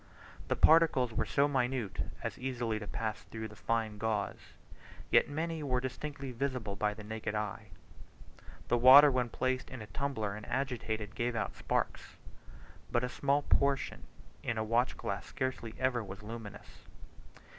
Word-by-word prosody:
The - - +1
particles 155 -7 +5
were - - -1
so 140 0 +3
minute 130 -6 -1 0.2
as - - -4
easily 120 -4 -2
to 105 - -7
pass 110 0 -3
through 110 -1 -6
fine 110 0 -2
gauze; 110 -2 -2 0.6
yet - - +5
many 160 +2 -2
were 130 -4 0
distinctly 135 +1 -5
visible 125 -5 -2
by 105 +1 0
the 110 - -9
naked 110 0 -4
eye. 105 0 -3 1.0
The 120 - +2
water 140 +4 +10
when 125 -2 0
placed 130 +2 -1
in 130 - -7
a 110 - -7
tumbler 110 -1 -2
and 105 +1 -7
agitated, 115 -5 -2
gave 120 +1 -1
out 110 - -2
sparks, - - -2 0.8
but 120 - +2
a 125 - -1
small 140 +2 +1
portion 140 -1 +1 0.4
in 120 - -2
a 110 - 0
watch 115 +3 +1
glass - - -4
scarcely 130 -4 -3
ever 130 -3 +1
was 95 +1 -9
luminous. 110 -1 -9
120 Hz, 155 wpm, -32 LUFS, 110-130 Hz, 1.0 s, water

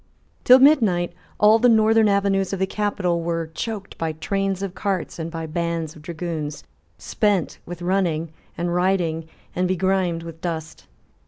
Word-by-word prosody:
Till 255 - +8
midnight 220 - +4 0.3
all 215 +2 +6
the 245 +2 +5
northern 220 -1 +4
avenues 200 -1 +1
of - - -1
the 190 - +1
capital 190 -4 -1
were 165 -1 -3
choked 210 +2 -5
by 160 -1 -1
trains 195 +4 -2
of 195 -2 -4
cars 190 -4 -3
and 165 0 -3
by 165 -1 -5
bands 165 0 -3
of 155 - -13
dragoons, 155 -2 -5 0.3
spent 205 -6 0
with 175 0 -7
running 175 -4 0 0.3
and 175 0 -1
riding, 175 -3 0 0.3
and 180 +1 +1
begrimed 185 -2 0
with 165 -1 -10
dust. 160 -3 -5
180 Hz, 155 wpm, -22 LUFS, 165-195 Hz, 0.3 s, Till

